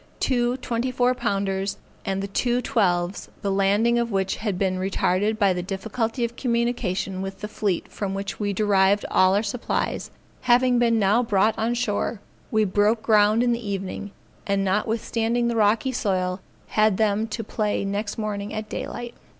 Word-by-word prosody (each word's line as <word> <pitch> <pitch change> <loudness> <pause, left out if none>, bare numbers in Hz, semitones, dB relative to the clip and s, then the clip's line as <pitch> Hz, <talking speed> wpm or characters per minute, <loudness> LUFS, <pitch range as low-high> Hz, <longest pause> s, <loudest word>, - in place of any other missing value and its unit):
Two 245 -1 +1
twenty 245 -1 -2
four 250 0 +2
pounders 195 -4 -1 0.3
and 195 0 -1
the - - -2
two 240 +5 0
twelves, 180 -6 0
the 200 - 0
landing 205 +5 +3
of 235 0 0
which 190 -1 0
had 205 -4 -2
been 185 -1 0
retarded 195 +2 +1
by 200 -3 +3
the 180 - -2
difficulty 220 +6 -2
of 235 0 -6
communication 235 -7 -1
with 195 0 -6
the 210 - -3
fleet 205 -4 -2
from 195 -2 -4
which 195 0 -4
we 205 -1 0
derived 200 0 +3
all 185 +1 +4
our 205 - +2
supplies, 225 +3 -2 0.4
having 245 0 +5
been 230 -1 +3
now 210 +3 +3
brought 215 -2 +2
on 230 +2 0
shore, 230 -2 -1 0.3
we 220 -1 +2
broke 210 +3 +2
ground 215 +1 +4
in 245 - +2
the 235 0 -2
evening, 200 0 -4 0.4
and 200 -1 +1
notwithstanding 225 +4 0
the 235 - -1
rocky 220 +4 +2
soil, 185 -6 -1 0.3
had 215 -2 +3
them 215 0 +1
to 225 +1 -4
play 210 -1 -1
next 200 +1 -3
morning 210 -2 -3
at 215 0 -4
daylight. 240 +2 -5
210 Hz, 170 wpm, -24 LUFS, 195-235 Hz, 0.4 s, having